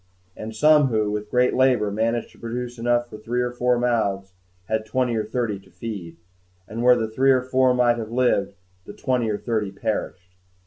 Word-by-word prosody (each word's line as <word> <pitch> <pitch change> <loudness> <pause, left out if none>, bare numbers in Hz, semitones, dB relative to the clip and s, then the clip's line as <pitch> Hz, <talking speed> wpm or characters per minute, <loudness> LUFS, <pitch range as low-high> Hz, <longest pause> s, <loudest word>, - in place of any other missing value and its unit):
And 110 +1 -7
some 150 +2 +5
who, 110 -4 0
with 105 0 -4
great 125 +2 +2
labor, 125 -6 +2
managed 115 +3 -1
to - - -21
produce 120 +1 -5
enough 120 +1 +1
for 105 - -11
three 120 +3 -2
or 125 - -2
four 125 0 +1
mouths, 100 -6 -1 0.3
had 110 0 -1
twenty 120 +2 -1
or 110 - 0
thirty 110 -2 -2
to 95 - -21
feed; 95 -8 -7 0.5
and 115 +2 -5
where 125 0 +6
the 115 -2 -1
three 130 +5 +1
or 130 -1 +4
four 130 0 +2
might 120 -1 +3
have 110 -1 -5
lived, 120 -5 +1 0.3
the - - -9
twenty 125 -3 -1
or 105 - -1
thirty 110 -4 -2
perished. 95 -3 -4
115 Hz, 195 wpm, -23 LUFS, 105-125 Hz, 0.5 s, where